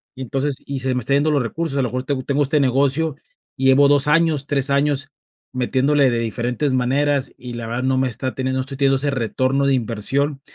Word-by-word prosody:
y 130 Hz, -, -9 dB
entonces, 135 Hz, +3 st, -2 dB
y 140 Hz, -1 st, -4 dB
se 130 Hz, 0 st, -1 dB
me -, -, 0 dB
está 130 Hz, +4 st, -1 dB
yendo 150 Hz, +2 st, +2 dB
los 145 Hz, -, +2 dB
recursos, 145 Hz, +4 st, -3 dB
a 135 Hz, -, +2 dB
lo -, -, 0 dB
mejor 125 Hz, +2 st, -3 dB
tengo 130 Hz, -1 st, -3 dB
tengo 140 Hz, +2 st, 0 dB
este 145 Hz, +2 st, +1 dB
negocio, 140 Hz, +3 st, +1 dB, 0.4 s
y 135 Hz, -, -2 dB
llevo 140 Hz, +2 st, +6 dB
2 145 Hz, 0 st, +4 dB
años, 155 Hz, -3 st, +2 dB
3 140 Hz, -2 st, 0 dB
años 140 Hz, 0 st, +1 dB, 0.4 s
metiéndole 130 Hz, +2 st, +2 dB
de 120 Hz, -, 0 dB
diferentes 120 Hz, +5 st, -1 dB
maneras, 135 Hz, +2 st, 0 dB
y 125 Hz, -1 st, -8 dB
la 120 Hz, -1 st, -5 dB
verdad 120 Hz, +3 st, -3 dB
no 130 Hz, 0 st, +1 dB
me 130 Hz, -1 st, +1 dB
está 130 Hz, +3 st, -4 dB
teniendo, 130 Hz, 0 st, -2 dB
no -, -, +1 dB
estoy 135 Hz, +1 st, -7 dB
teniendo 135 Hz, -1 st, +3 dB
ese 140 Hz, +1 st, -1 dB
retorno 130 Hz, +2 st, 0 dB
de 140 Hz, -, +3 dB
inversión, 135 Hz, +5 st, -1 dB
135 Hz, 230 wpm, -20 LUFS, 130-145 Hz, 0.4 s, llevo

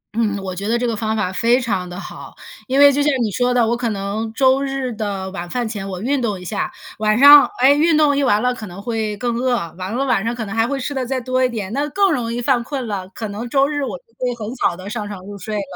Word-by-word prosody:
嗯， 215 Hz, -3 st, 0 dB
我 185 Hz, -1 st, -5 dB
觉 200 Hz, +2 st, -4 dB
得 235 Hz, +2 st, +2 dB
这 245 Hz, -, -1 dB
个 230 Hz, -2 st, -1 dB
方 220 Hz, 0 st, -2 dB
法 190 Hz, -3 st, -1 dB
非 235 Hz, +5 st, +3 dB
常 195 Hz, -7 st, -2 dB
地 180 Hz, +1 st, -7 dB
好， -, -, -10 dB, 0.3 s
因 265 Hz, +1 st, +1 dB
为 285 Hz, 0 st, +8 dB
就 285 Hz, +1 st, 0 dB
像 295 Hz, +1 st, +3 dB
你 215 Hz, -, -1 dB
说 245 Hz, +5 st, +1 dB
的， 245 Hz, -2 st, +3 dB
我 235 Hz, -, +1 dB
可 240 Hz, -1 st, -2 dB
能 210 Hz, +2 st, -3 dB
周 265 Hz, +2 st, +3 dB
日 270 Hz, -2 st, -2 dB
的 200 Hz, -3 st, -4 dB
晚 175 Hz, -3 st, -6 dB
饭 245 Hz, +4 st, -2 dB
前 205 Hz, -3 st, -5 dB
我 185 Hz, -2 st, -5 dB
运 275 Hz, +2 st, 0 dB
动 210 Hz, -5 st, -2 dB
一 180 Hz, -, -11 dB
下， 200 Hz, +3 st, -3 dB, 0.3 s
晚 215 Hz, 0 st, +2 dB
上， 285 Hz, +2 st, +9 dB
哎， 260 Hz, +2 st, +6 dB
运 310 Hz, +2 st, +3 dB
动 295 Hz, -2 st, +4 dB
一 285 Hz, -, +1 dB
完 210 Hz, -6 st, +3 dB
了 250 Hz, 0 st, +2 dB
可 220 Hz, -4 st, -8 dB
能 180 Hz, +1 st, -10 dB
会 220 Hz, -1 st, -3 dB
更 240 Hz, +2 st, -2 dB
饿， 250 Hz, +1 st, +1 dB, 0.2 s
完 185 Hz, +2 st, -5 dB
了 270 Hz, -, 0 dB
晚 250 Hz, -7 st, +1 dB
上 230 Hz, +2 st, -2 dB
可 230 Hz, -2 st, -4 dB
能 200 Hz, -, -6 dB
还 225 Hz, 0 st, +2 dB
会 275 Hz, +1 st, -2 dB
吃 275 Hz, +2 st, -3 dB
得 265 Hz, -2 st, -2 dB
再 260 Hz, +1 st, -2 dB
多 255 Hz, +1 st, 0 dB
一 255 Hz, -, +3 dB
点， 215 Hz, -4 st, -5 dB
那 290 Hz, +3 st, -1 dB
更 390 Hz, +5 st, +2 dB
容 235 Hz, -5 st, -2 dB
易 235 Hz, -, -3 dB
犯 245 Hz, 0 st, +1 dB
困 265 Hz, 0 st, -4 dB
了， 195 Hz, -4 st, -4 dB
可 220 Hz, -, -4 dB
能 215 Hz, +4 st, -6 dB
周 275 Hz, +2 st, +3 dB
日 290 Hz, -1 st, -2 dB
我 275 Hz, -, -4 dB
就 -, -, -25 dB, 0.2 s
会 250 Hz, -1 st, -1 dB
很 225 Hz, 0 st, -6 dB
早 240 Hz, -8 st, 0 dB
地 185 Hz, +1 st, -9 dB
上 210 Hz, -1 st, -4 dB
床 205 Hz, -2 st, -7 dB
入 205 Hz, +1 st, -8 dB
睡 215 Hz, +2 st, -5 dB
了， 205 Hz, -, -1 dB
235 Hz, 310 characters per minute, -19 LUFS, 205-260 Hz, 0.3 s, 上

